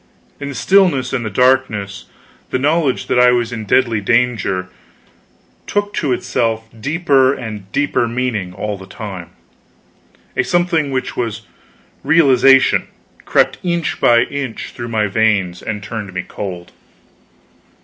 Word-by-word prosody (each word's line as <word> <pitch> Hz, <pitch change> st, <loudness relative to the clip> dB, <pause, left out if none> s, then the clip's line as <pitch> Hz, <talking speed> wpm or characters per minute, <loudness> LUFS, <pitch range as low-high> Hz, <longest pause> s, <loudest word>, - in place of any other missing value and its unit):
In 140 Hz, 0 st, -5 dB
the 140 Hz, -, -7 dB
stillness 175 Hz, -10 st, +2 dB
and 120 Hz, -, -1 dB
the 110 Hz, -, -3 dB
darkness, 110 Hz, -4 st, +1 dB, 0.4 s
the -, -, 0 dB
knowledge 145 Hz, 0 st, +1 dB
that -, -, +1 dB
I 125 Hz, 0 st, +6 dB
was 120 Hz, -1 st, +1 dB
in 110 Hz, -2 st, -5 dB
deadly 115 Hz, 0 st, +2 dB
danger 115 Hz, -5 st, +1 dB, 1.0 s
took 205 Hz, 0 st, -1 dB
to 145 Hz, -, -1 dB
itself 115 Hz, -2 st, -1 dB
deeper 140 Hz, -1 st, +2 dB
and 105 Hz, -5 st, -8 dB
deeper 145 Hz, -4 st, +1 dB
meaning 115 Hz, -6 st, -2 dB
all 105 Hz, +2 st, -4 dB
the 95 Hz, -, -11 dB
time; 95 Hz, -6 st, -8 dB, 1.1 s
a -, -, +2 dB
something 175 Hz, -4 st, +1 dB
which 130 Hz, -1 st, -3 dB
was 115 Hz, -3 st, -3 dB, 0.6 s
realization 135 Hz, -3 st, +4 dB, 0.4 s
crept -, -, +2 dB
inch 170 Hz, -2 st, -2 dB
by 120 Hz, 0 st, +5 dB
inch 135 Hz, -4 st, -5 dB
through 120 Hz, 0 st, -7 dB
my 110 Hz, -2 st, +1 dB
veins 100 Hz, -4 st, +1 dB
and 105 Hz, -2 st, -5 dB
turned 105 Hz, -1 st, -6 dB
me 90 Hz, -, -2 dB
cold. 90 Hz, -4 st, -6 dB
120 Hz, 135 wpm, -17 LUFS, 105-135 Hz, 1.1 s, I